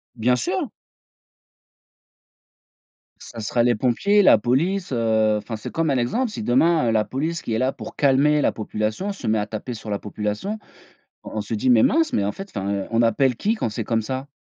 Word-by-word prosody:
Bien 125 +2 +2
sûr! 125 - -2 2.5
Ça 115 - -10
serait 115 +2 0
les 120 0 +3
pompiers, 135 - +2
la 190 - +7
police, 165 - 0
heu, 110 -3 +2
enfin 105 +2 -5
c'est 110 - -7
comme 165 -1 0
un 135 - +2
exemple, 230 - 0
si 210 - -5
demain, 150 +5 +3
heu, - - +2
la 110 -1 +2
police 155 +5 -3
qui 115 - -4
est - - +1
là 130 +1 +1
pour - - -10
calmer 145 +2 +3
la - - +2
population, 110 - -3
se 195 - -9
met 110 0 +2
à 105 - -2
taper 110 +3 -5
sur 110 -1 -9
la 100 -1 -2
population. 105 - -4 0.6
On - - -9
on - - 0
se 105 +2 -6
dit: 120 +4 0
«Mais 115 -2 +5
mince 325 +2 +2
mais 100 - +1
en 100 - 0
fait, 195 - -9
enfin, 100 0 -2
heu, 100 -1 -2
on 115 0 +2
appelle 120 +3 +2
qui 210 - 0
quand 165 - -2
c'est 110 +2 -4
comme 115 +1 0
ça?». 130 +4 -4
120 Hz, 210 wpm, -22 LUFS, 110-150 Hz, 2.5 s, la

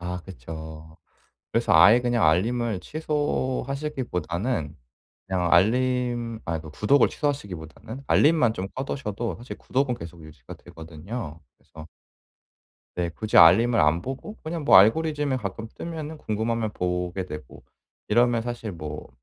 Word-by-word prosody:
아 90 +1 -5
그쵸. 80 -3 -10 0.5
그래서 - - +1
아예 100 +9 +7
그냥 120 -4 +1
알림을 110 +5 +1
취소하시기보다는 130 - -2 0.5
그냥 90 -2 -1
알림 120 +3 +2
아 80 -1 -2
그러니까 80 -1 -10
구독을 105 - +3
취소하시기보다는 110 - -5
알림만 150 -7 +4
좀 95 -1 -4
꺼 130 - -3
두셔도 115 -4 -4
사실 120 +2 -9
구독은 130 -1 0
계속 85 -4 -10
유지가 80 -1 -12
되거든요. 80 +2 -8 0.2
그래서 80 0 -13 1.1
네, 85 -1 -1
굳이 110 +6 -1
알림을 115 +8 +7
안 75 +1 +3
보고 135 - -7
그냥 160 0 -4
뭐 - - +6
알고리즘에 145 +6 +3
가끔 105 +1 -5
뜨면은 160 -2 -6
궁금하면 110 -2 -2
보게 90 +1 -2
되고 75 -7 -10 0.4
이러면 120 +1 +3
사실 120 -2 -5
뭐 75 -3 -7
110 Hz, 320 characters per minute, -25 LUFS, 85-130 Hz, 1.1 s, 아예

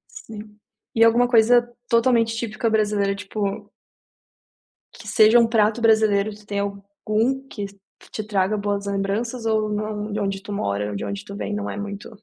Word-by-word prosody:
Sim. 210 -1 -10 0.4
E 225 - +5
alguma 235 +2 +5
coisa 240 +1 +4 0.2
totalmente 230 -1 +2
típica 225 0 -2
brasileira 210 -2 +1
tipo 205 +1 -4 1.2
Que - - -13
seja 220 +2 +6
um 230 - +4
prato 225 0 +2
brasileiro, 215 -2 +3
tu 210 0 -16
tem 205 -1 -3
algum 210 +6 -2
que 205 - -5 0.5
te 215 - -4
traga 205 0 0
boas 205 0 -2
lembranças 210 +5 -2
ou 215 -1 +1
na 210 0 -3
de 210 - -2
onde 195 -1 -2
tu 200 - -9
mora 105 - -2
ou 105 - -5
de 100 - -4
onde 100 0 -5
tu 200 - -8
vem 210 - -4
não 205 0 -3
é - - -5
muito 205 0 -6
210 Hz, 170 wpm, -22 LUFS, 200-225 Hz, 1.2 s, seja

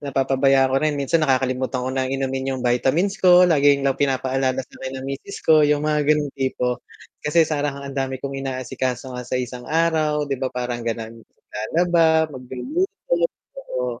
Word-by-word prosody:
napapabayaan 135 -1 +2
ko - - +3
rin, 155 -1 0
minsan 140 +4 +1
nakakalimutan 130 -2 0
ko 130 - -2
ng 130 -1 -1
inumin 135 0 -2
'yung 125 - -6
vitamins 160 - +1
ko, 180 -1 +7
laging 145 -4 +4
lang 135 -1 0
pinapaalala 130 -1 0
sa - - -36
akin 130 0 -5
ng 130 - -7
misis 140 +8 -7
ko, 155 -1 +6
'yung 150 0 +2
mga 150 -1 +1
gano'ng 150 -2 +2
tipo. 125 -2 -2 0.4
Kasi 160 +2 +3
parang 145 -2 -2
ang 140 - -6
dami 135 -1 -2
kong 135 +1 -6
inaasikaso 130 -1 -3
nga 125 0 -5
sa - - -1
isang 125 0 -5
araw 155 -2 +1
'di 140 -1 -2
ba 130 - 0
parang 125 -1 -4
gano'n. 115 -1 -4
Maglalaba, 160 +8 0
magluluto, 275 - -4 0.6
oo - - -3
135 Hz, 170 wpm, -22 LUFS, 130-150 Hz, 0.6 s, ko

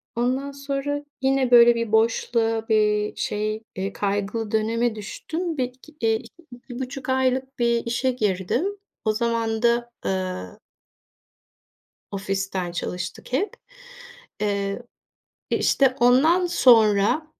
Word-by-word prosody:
ondan 260 +4 -1
sonra 280 +1 -3 0.2
yine 265 -1 +2
böyle 240 -1 +8
bir 230 -2 -2
boşluğa, 225 0 +1
bir 210 -1 +2
şey, 215 +1 -2
eee, 195 +1 -3
kaygılı 205 +2 -2
döneme 225 +1 +1
düştüm. 320 - -5
Bir, 260 - +1
iki 255 +5 -14
eee, 225 -1 +3
2-2.5 260 -1 -8
aylık 260 0 0
bir 235 -1 +1
işe 245 +3 0
girdim. 205 - 0 0.4
O 215 - +2
zaman 230 -1 -1
da, 240 0 +2
eee 185 - -3 1.5
ofisten 195 -2 -3
çalıştık 175 +4 -5
hep. 320 +12 0 0.9
Eee, 200 +1 -1 0.7
e, - - +2
işte 265 -2 +3
ondan 310 +9 +5
sonra, 225 - +4
235 Hz, 110 wpm, -24 LUFS, 210-260 Hz, 1.5 s, böyle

